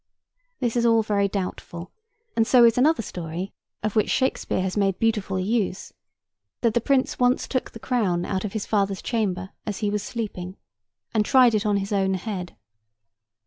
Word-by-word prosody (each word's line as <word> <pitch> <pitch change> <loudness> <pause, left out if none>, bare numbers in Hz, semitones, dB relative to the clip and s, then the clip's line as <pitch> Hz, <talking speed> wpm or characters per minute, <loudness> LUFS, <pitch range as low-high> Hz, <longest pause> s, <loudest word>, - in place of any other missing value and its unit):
This 240 -3 -1
is 240 - +2
all 230 -1 +4
very 205 -2 +1
doubtful, 185 -3 -5 0.4
and 225 -1 +2
so 245 -2 +7
is 230 -1 +5
another 280 0 +3
story 175 +1 -5 0.3
(of 215 -1 -1
which 215 - +2
Shakespeare 260 -7 0
has 190 -1 -2
made 195 -3 +1
beautiful 210 -4 0
use), 200 -1 -1 0.7
that 230 -3 +2
the 235 - +2
Prince 270 +2 +1
once 250 +1 +2
took 255 - -2
the 225 - -11
crown 195 -9 0
out 190 -1 -2
of 210 - -4
his 215 -2 -3
father's 200 -3 0
chamber 190 -5 -1 0.2
as 205 -3 -2
he 205 - +1
was 210 0 -1
sleeping, 200 -5 -5 0.6
and 215 -2 +3
tried 250 +1 +5
it 215 0 +1
on 205 -1 +2
his 195 +1 -3
own 190 -1 +2
head. 185 -2 -5
210 Hz, 180 wpm, -24 LUFS, 190-230 Hz, 0.7 s, so